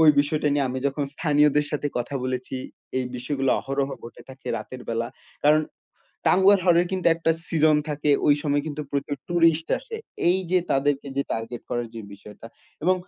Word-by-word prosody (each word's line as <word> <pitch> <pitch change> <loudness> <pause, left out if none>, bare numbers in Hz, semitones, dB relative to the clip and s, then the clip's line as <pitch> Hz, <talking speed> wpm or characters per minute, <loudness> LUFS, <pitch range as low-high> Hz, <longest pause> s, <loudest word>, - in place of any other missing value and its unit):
ওই 160 - +7
বিষয়টা 150 +1 0
নিয়ে, 140 -1 +2
আমি 130 +1 -2
যখন 140 +1 -1
স্থানীয়দের 150 -2 +3
সাথে 145 0 -1
কথা 120 +3 -4
বলেছি, 130 0 -3 0.4
এই 130 - -1
বিষয়গুলো 135 +1 -1
অহরহ 135 0 -1 0.2
ঘটে 120 - -11
থাকে 130 0 -13
রাতের 130 - -7
বেলা 115 0 -1 0.4
কারণ, 155 +1 +5 0.6
টাঙ্গুয়ার 190 +1 +6
হাওর 175 -2 +5
এর 175 - 0
কিন্তু 185 -2 -1
একটা 165 0 0 0.2
সিজন 155 -2 +4
থাকে 150 0 0 0.2
ওই 145 - +7
সময় 145 -1 +1
কিন্তু 150 0 -4
প্রচুর 140 0 -2
ট্যুরিস্ট 165 -2 +3
আসে। 470 -2 -7 0.3
এই 180 - +4
যে 185 - +5
তাদেরকে 140 0 +1
যে 140 - +2
টার্গেট 115 +1 -4
করার 120 0 -1
যে 115 - -5
বিষয়টা 105 +2 -12 0.4
এবং 185 +3 +4
145 Hz, 180 wpm, -25 LUFS, 130-160 Hz, 0.6 s, ওই